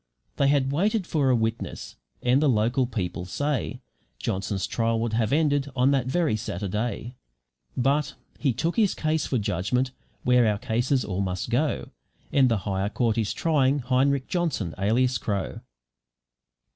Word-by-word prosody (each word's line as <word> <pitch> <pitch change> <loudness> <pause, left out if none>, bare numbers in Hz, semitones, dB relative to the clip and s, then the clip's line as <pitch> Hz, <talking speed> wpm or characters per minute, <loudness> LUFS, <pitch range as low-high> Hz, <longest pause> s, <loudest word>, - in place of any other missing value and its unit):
They 140 - +3
had 140 -1 +2
waited 200 +6 +1
for 145 -6 +1
a 125 - +4
witness, 110 0 -3 0.3
and 125 +3 +3
the 150 - +4
local 120 +2 +2
people 90 -6 -3
say 145 +9 -2 0.4
Johnson's 95 0 -2
trial 115 -1 0
would 115 -1 -1
have 110 -1 +1
ended 145 -2 +2
on 130 +2 +3
that 135 -3 +1
very 155 -3 +1
Saturday; 110 +2 -3 0.6
but 140 +4 +1 0.2
he 140 - +2
took 165 - -2
his 210 -4 +3
case 155 -1 0
for 130 - 0
judgment 105 +5 0 0.3
where 125 -2 +4
our 105 -1 +1
cases 125 +3 0
all 95 -1 -2
must 95 -2 -3
go, - - 0 0.4
and 135 -2 +5
the 115 - +2
higher 100 0 -1
court 115 +1 0
is 110 - 0
trying 145 -4 +2
Heinrich 135 +1 +1
Johnson 155 - -1
(alias 125 +6 +2
Crow). 100 -3 -3
125 Hz, 155 wpm, -26 LUFS, 110-140 Hz, 0.6 s, and